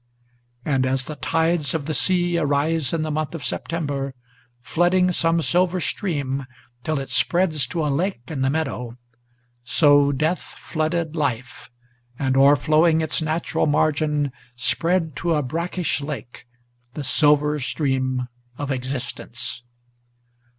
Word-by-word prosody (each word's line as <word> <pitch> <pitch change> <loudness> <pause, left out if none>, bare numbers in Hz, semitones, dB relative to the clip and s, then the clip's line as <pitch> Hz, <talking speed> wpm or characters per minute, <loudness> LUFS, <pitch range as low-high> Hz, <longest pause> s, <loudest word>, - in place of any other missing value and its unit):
And, 135 -4 +2
as 130 0 0
the 155 - -6
tides 160 -1 +1
of 150 -3 -2
the 155 - -2
sea 175 +1 +2
arise 145 0 +1
in 165 -2 0
the 155 - -2
month 155 +2 -2
of 160 - -6
September, 140 -5 -3 0.5
Flooding 180 +5 +2
some 165 -1 +1
silver 180 +2 +2
stream, 140 -7 -2 0.4
till 155 +1 -1
it 135 - -6
spreads 165 -7 +2
to 155 +4 -2
a - - +1
lake 180 -2 -1
in 140 -4 -3
the 135 - +2
meadow, 125 -6 -3 0.7
So 145 +2 +4
death 155 +6 0
flooded 160 0 -3
life, 130 -4 -3 0.5
and, 130 -1 0
o'erflowing 155 +4 +5
its 160 - +1
natural 160 +1 0
margin, 150 -1 +1 0.2
Spread 165 +4 0
to 170 -1 +1
a 150 - +1
brackish 165 +1 -2
lake, 135 -4 -7 0.5
the 150 - -4
silver 150 +2 +3
stream 130 -2 -1 0.3
of 145 -1 -3
existence. 130 -1 -4
150 Hz, 130 wpm, -23 LUFS, 135-165 Hz, 0.7 s, o'erflowing